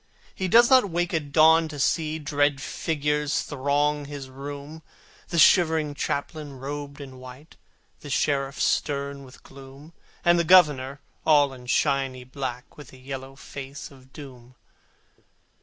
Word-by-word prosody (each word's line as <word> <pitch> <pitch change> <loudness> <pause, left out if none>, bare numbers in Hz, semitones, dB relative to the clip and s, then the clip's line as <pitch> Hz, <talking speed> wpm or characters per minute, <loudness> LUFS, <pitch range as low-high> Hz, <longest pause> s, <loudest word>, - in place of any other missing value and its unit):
He 190 - -3
does 235 +6 +6
not 255 -6 +6
wake 175 +1 -2
at 150 -3 -2
dawn 160 +1 +5
to 155 -1 -8
see 155 +2 0
Dread 145 -2 0
figures 150 0 -1
throng 145 +1 -1
his 140 -2 -8
room, 145 +3 -8 0.5
The 170 - -4
shivering 160 -3 +4
Chaplain 145 +1 -4
robed 140 +2 -7
in 130 -2 -10
white, 130 +5 -13 0.4
The 145 - -10
Sheriff 140 0 -1
stern 140 -1 -1
with 130 -1 -16
gloom, 135 +4 -14 0.3
And 175 0 +5
the - - +2
Governor 150 -6 +4 0.2
all 145 -3 +4
in 125 -1 -13
shiny 135 -2 0
black, 130 -1 -7
With 145 -4 -11
the 130 - -15
yellow 135 0 -8
face 140 +1 -9
of 130 -1 -18
Doom. 130 -4 -12
145 Hz, 140 wpm, -25 LUFS, 135-155 Hz, 0.5 s, does